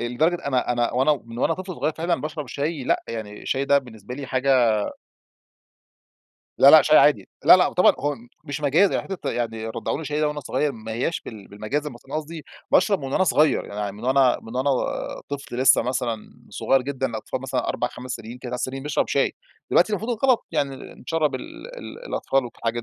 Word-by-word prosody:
آآ - - -2
لدرجة 155 +9 +2
أنا 130 -3 +1
أنا 120 -1 0
وأنا 135 +3 +2
من 115 0 -9
وأنا 165 - +2
طفل 185 0 -6
صغير 150 +3 -1
فعلًا 170 +3 -1
باشرب 150 -1 -5
شاي 145 +1 -3
لأ، - - +1
يعني 110 -2 -6
الشاي 135 +1 -1
ده 140 +1 +4
بالنسبة 120 -3 -9
لي 140 0 -6
حاجة 130 +1 0 2.1
لا، - - +9
لأ، - - +9
شاي - - +6
عادي. - - +4 0.2
لا، - - +10
لأ، 180 - +2
طبعًا 180 - +5
هو 145 0 -1 0.3
مش 145 -1 -5
مجازًا، 155 +7 +3
حتة 195 -2 -4
يعني 115 -2 -3
رضّعوني 140 +7 -3
شاي 150 +1 -2
ده 150 - +2
وأنا 150 0 -4
صغير، 140 +2 -1
ما 110 -2 -8
هياش 125 +9 -1
بال 105 -4 -10
بالمجازًا، 135 +9 -3
بس 120 - -13
أنا 135 - -8
قصدي 155 0 -5 0.3
باشرب 190 0 +3
من 135 - -5
وأنا 190 - +3
صغير، 155 -5 +3
يعني 100 -1 -4
من 105 +4 -10
وأنا 130 -1 +4
من 115 +2 -8
وأنا 130 +2 +1 0.6
طفل 140 -3 -6
لسه 130 - +5
مثلًا 120 -3 -3 0.2
صغير 135 -1 +1
جدًا، 135 0 -2
الأطفال 115 +2 -5
مثلًا 130 -2 -2
4 125 - -1
5 125 +1 -10
سنين، 120 0 -6
3 125 -1 -5
سنين 135 +1 -4
بيشرب 150 0 0
شاي، - - +1 0.4
دلوقتي 195 +5 +4
المفروض 225 +3 -2
ده 270 - +3
غلط، 250 -3 +3
يعني 140 -1 -1 0.2
نشرَّب 155 0 -1
ال 325 - -8
ال - - -10
الأطفال 135 - 0
وحاجات 120 -1 -4
135 Hz, 200 wpm, -24 LUFS, 120-155 Hz, 2.1 s, لا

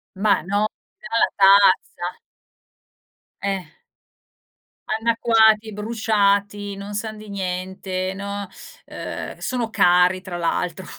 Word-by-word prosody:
Ma 205 -2 +2
no, 205 +3 0 0.3
dalla 225 +2 +1
tazza. 195 -2 +4 1.2
Eh. 195 -3 -2 1.2
Annacquati, 220 -1 +3
bruciati, 205 -2 0
non 200 +1 -8
san 215 +1 -4
di 215 -1 -11
niente, 185 0 -3
no. 200 0 -5 0.4
Uhm, - - -7
sono 245 -3 -2
cari 180 -1 +4
tra 180 -2 -6
l'altro. 175 +1 -2
200 Hz, 95 wpm, -22 LUFS, 185-215 Hz, 1.2 s, tazza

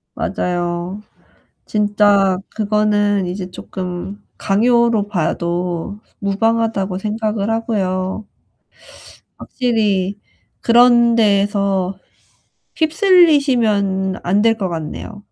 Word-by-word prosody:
맞아요. 175 +2 -3 0.6
진짜 205 -2 +2 0.2
그거는 205 -2 +1
이제 180 +1 -5
쪼끔 185 +3 -7
강요로 230 0 +2
봐도 175 +1 -2 0.2
무방하다고 200 -1 0
생각을 215 0 -2
하고요. 200 -3 -2 1.1
확실히 205 -6 -1 0.4
그런 235 0 +5
데에서 200 -3 +1 0.8
휩쓸리시면 270 - +2
안 195 +4 +2
될 225 0 +3
것 190 - -2
같네요. 170 +5 -7
205 Hz, 185 characters per minute, -18 LUFS, 190-225 Hz, 1.1 s, 그런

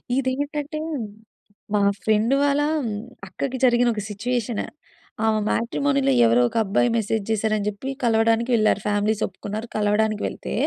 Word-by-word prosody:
ఇదేంటంటే, 285 +3 -2 1.0
మా 205 - +3 0.2
ఫ్రెండ్ 220 +3 +2
వాళ్ళ, 285 0 +2 0.7
అక్కకి 260 +7 -4
జరిగిన 245 0 +4
ఒక 210 - -4
సిట్యుయేషన్. 230 +1 -2 0.6
ఆమె 220 -1 +2
మ్యాట్రిమోనీలో 140 - +1
ఎవరోక 120 +1 +3
అబ్బాయి 210 +4 +1
మెసేజ్ 220 -1 -1
జేసారని 215 -1 0
చెప్పి, 210 +6 -6
కలవడానికి 225 +1 +2
వెళ్లారు. 215 -2 +2
ఫ్యామిలీస్ 210 +1 +1
ఒప్పుకున్నారు. 210 +4 -7
కలవడానికి 210 0 +1
వెళ్తే, - - -6
220 Hz, 120 wpm, -23 LUFS, 205-245 Hz, 1.0 s, జరిగిన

